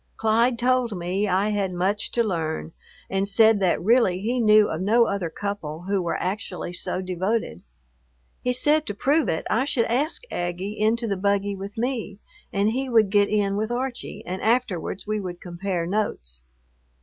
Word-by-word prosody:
Clyde 230 +2 +2
told 245 -3 +1
me 185 +4 -1
I 195 +2 +1
had 200 -3 -1
much 190 +4 -1
to 235 - +2
learn, 165 -6 -2 0.4
and 195 +1 -1
said 220 +1 +5
that 185 -3 +2
really 225 -4 +4
he 235 +5 -1
knew 215 -2 +6
of 160 - -3
no 230 +5 +4
other 200 -5 -2
couple 175 -4 -5
who 195 +1 0
were 170 - -1
actually 185 -2 -4
so 180 +1 -1
devoted. 185 - -2 0.8
He 250 - 0
said 295 +5 +3
to 205 - -3
prove 285 +8 +2
it 160 - -2
I 230 +5 +1
should 240 -5 +1
ask 285 - 0
Aggie 180 +4 -3
into 225 +2 +2
the 200 -2 -1
buggy 200 +1 0
with 195 +2 -8
me 230 -4 -2 0.3
and 205 +2 +1
he 260 +3 -2
would 220 -5 +4
get 205 -1 +4
in 200 -2 +1
with 215 +1 -1
Archie, 245 +1 -4
and 185 +2 -4
afterwards 220 -6 0
we 215 0 -1
would 180 -3 -6
compare 175 -1 -3
notes. 65 - -3
205 Hz, 175 wpm, -24 LUFS, 185-230 Hz, 0.8 s, knew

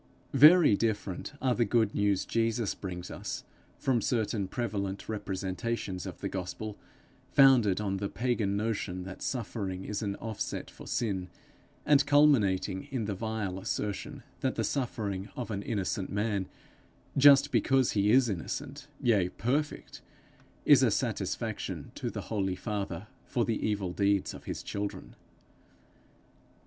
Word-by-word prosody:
Very 150 - +8
different 105 0 -2
are 130 -2 +3
the 120 - +2
good 115 -3 +2
news 100 -2 +1
Jesus 115 -1 0
brings 90 -2 -6
us - - -5 0.3
from 125 -3 +1
certain 110 -4 0
prevalent 100 -3 -3
representations 95 -1 -3
of - - -8
the - - -1
gospel, 100 +3 -5 0.5
founded 125 -9 +5
on 100 -2 -1
the 100 0 -3
pagan 110 -5 0
notion 100 -4 -2
that 95 0 -9
suffering 100 -6 -3
is 105 0 -3
an 100 -2 -2
offset 110 -1 -4
for - - -12
sin, 95 -6 -1 0.6
and 145 -1 +5
culminating 110 -10 +3
in 130 -6 -2
the 100 - -2
vile 105 -2 -3
assertion 110 +7 -4 0.2
that 130 -1 -1
the - - 0
suffering 105 -7 -2
of 120 -3 -4
an 100 -1 -2
innocent 100 -3 -2
man, 100 -2 -1 0.7
just 140 +1 +7
because 130 -4 +3
he 100 0 +2
is 125 +2 +5
innocent, 135 - -5 0.2
yea 105 -7 +3
perfect, 140 +10 -2 0.6
is - - +7
a - - +5
satisfaction - - -2
to - - -4
the - - -5
holy 95 -4 -1
Father 100 -3 -4 0.2
for 120 -2 0
the 115 - -1
evil 100 -4 -1
deeds 100 0 +1
of - - -11
his - - -5
children. 100 0 -5
105 Hz, 140 wpm, -30 LUFS, 95-120 Hz, 0.7 s, Very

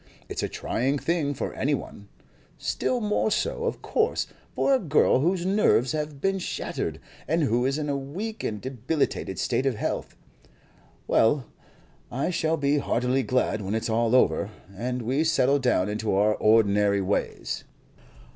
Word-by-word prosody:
It's - - -4
a - - -2
trying 135 +5 -1
thing 150 -2 0
for - - -3
any 145 +2 +1
one; 100 -5 -9 0.5
still 250 -1 -1
more 210 0 +1
so, - - -1
of - - -3
course, 450 +1 +1 0.3
for 275 - +3
a 265 - +4
girl 155 - +3
whose 175 +4 +1
nerves 190 - +3
have 150 -2 -3
been 195 +4 0
shattered, - - -3 0.3
and 165 +3 +2
who 120 -1 +2
is 135 +2 0
in 150 -1 -2
a 140 - 0
weak 185 +12 -5
and 105 -1 -2
debilitated 130 +5 -2
state 135 - 0
of 130 - +1
health. - - -3 0.9
Well, 125 +4 +3 0.7
I 135 +8 -1
shall 160 -1 0
be 145 0 +2
heartily 125 0 +1
glad 125 -4 0
when 100 +2 -2
it's 110 0 -1
all 115 +2 +2
over, 105 -5 +3 0.3
and 125 +4 -3
we 130 +7 +1
settle 145 -4 +3
down 125 -8 +2
into 105 -1 -1
our 105 +2 +4
ordinary 105 -2 +3
ways." 100 +2 -2
135 Hz, 160 wpm, -26 LUFS, 115-160 Hz, 0.9 s, a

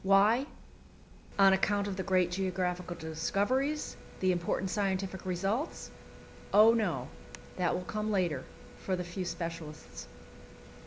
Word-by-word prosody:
Why? 205 +7 +4 0.9
On 195 -1 +7
account 200 +1 +1
of 200 - -3
the 190 - -2
great 185 -2 +2
geographical 180 -1 -2
discoveries, 200 - -1 0.2
the 185 0 +3
important 180 +1 -1
scientific 190 -2 -1
results? 195 - -2 0.6
Oh 215 +3 +8
no; 175 - 0 0.5
that 180 -2 +1
will 180 - -3
come 215 +3 -3
later, 175 -10 0 0.4
for 190 - -1
the 180 - -3
few 180 +2 -5
specialists. 165 - -6
190 Hz, 120 wpm, -31 LUFS, 175-205 Hz, 0.9 s, Oh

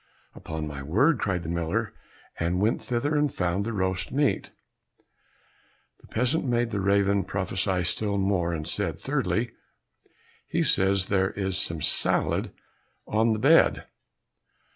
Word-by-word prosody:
"Upon 80 -1 -6
my 75 -2 -6
word!" 115 - +2
cried 90 -4 -1
the 80 - -5
miller, 85 +6 -2 0.5
and 85 +2 0
went 105 +4 +1
thither, 125 +5 -1
and 150 -1 +2
found 90 +2 -1
the 115 - -3
roast 95 -4 -1
meat. 140 0 0 1.5
The - - -19
peasant 125 +7 0
made 120 -2 0
the 100 - -1
raven 100 0 +2
prophesy 95 -1 -1
still 100 +3 -1
more, 95 -3 +1
and 80 -2 -4
said, - - 0
"Thirdly, - - -1 1.0
he - - 0
says 95 0 +3
that 100 - -1
there 95 0 +2
is 95 -2 -3
some 85 -4 -1
salad - - +1 0.5
on 110 +1 +2
the - - -1
bed." 105 - +4
100 Hz, 140 wpm, -26 LUFS, 90-110 Hz, 1.5 s, bed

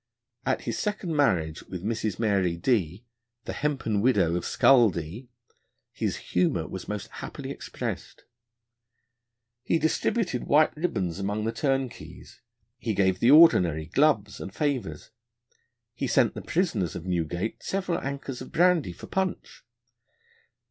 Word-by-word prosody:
At - - +1
his - - -3
second 205 -6 -2
marriage 85 - +1
with 90 -1 -7
Mrs. 110 -2 -2
Mary 100 -6 +1
D 95 -1 0
n, - - -41 0.4
the - - -4
hempen 135 -8 -1
widow 100 -9 +3
of 90 - -2
Scull 120 -5 +5
D 90 +9 -6
n, 120 -1 -42 0.4
his - - -2
humour 90 -3 0
was 95 +2 -7
most 105 -1 -4
happily - - -6
expressed: - - -6 1.4
he 165 - +1
distributed 160 - 0
white 155 +2 +4
ribbons 95 - -2
among 100 +2 -2
the 115 - 0
turnkeys, 135 -2 -3 0.4
he 110 -2 -2
gave 95 -1 +2
the 120 - +4
Ordinary 90 - +6
gloves 120 - +1
and 95 - -6
favours, 130 - -2 0.8
he - - -3
sent - - +3
the - - -6
prisoners 125 - -1
of 85 - -6
Newgate 90 +3 -2
several 185 -3 -2
ankers 135 -2 -5
of - - -9
brandy 170 - +3
for - - -11
punch. 190 -1 -3
115 Hz, 140 wpm, -27 LUFS, 90-145 Hz, 1.4 s, Ordinary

